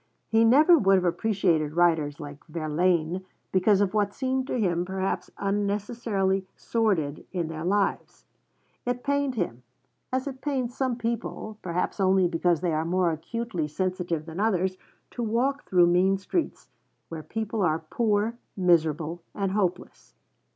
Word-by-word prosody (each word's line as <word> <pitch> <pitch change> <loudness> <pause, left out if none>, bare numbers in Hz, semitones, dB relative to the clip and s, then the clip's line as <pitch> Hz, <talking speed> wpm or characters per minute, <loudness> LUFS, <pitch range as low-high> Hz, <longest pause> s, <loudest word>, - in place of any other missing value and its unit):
He 225 0 +4
never 300 +9 +6
would 195 -3 +4
have 185 -1 +2
appreciated 175 -4 +1
writers 160 -4 +2
like 145 -2 -9
Verlaine, 165 +2 0 0.3
because 190 +2 +3
of 195 -2 +1
what 205 -1 0
seemed 260 -1 -1
to 250 - -1
him 175 -5 +1
perhaps 190 +1 -2
unnecessarily 200 -1 -1
'sordid' 185 -11 0
in 175 -4 -2
their 160 -1 -5
lives. 200 +3 -1 0.6
It 245 0 -2
pained 280 -2 0
him, 170 - -2 0.5
as 260 0 -1
it 265 -2 -6
pains 260 -4 -2
some 260 -3 0
people, 230 -2 -4
perhaps 180 +3 -2
only 190 -1 +4
because 170 -1 +1
they 175 -3 0
are 155 +1 0
more 175 +1 +1
acutely 170 +1 -3
sensitive 175 -1 -2
than 165 +2 -7
others, 190 -3 +1 0.4
to 245 - -5
walk 245 +6 0
through 180 -2 +5
mean 180 +3 +3
streets, 325 - -3 0.4
where 165 -1 -6
people 220 +4 -3
are 160 -4 +2
poor, 225 0 +1 0.2
miserable, 165 -2 +2
and 195 -2 -1
hopeless. 190 -3 -3
190 Hz, 145 wpm, -26 LUFS, 170-225 Hz, 0.6 s, never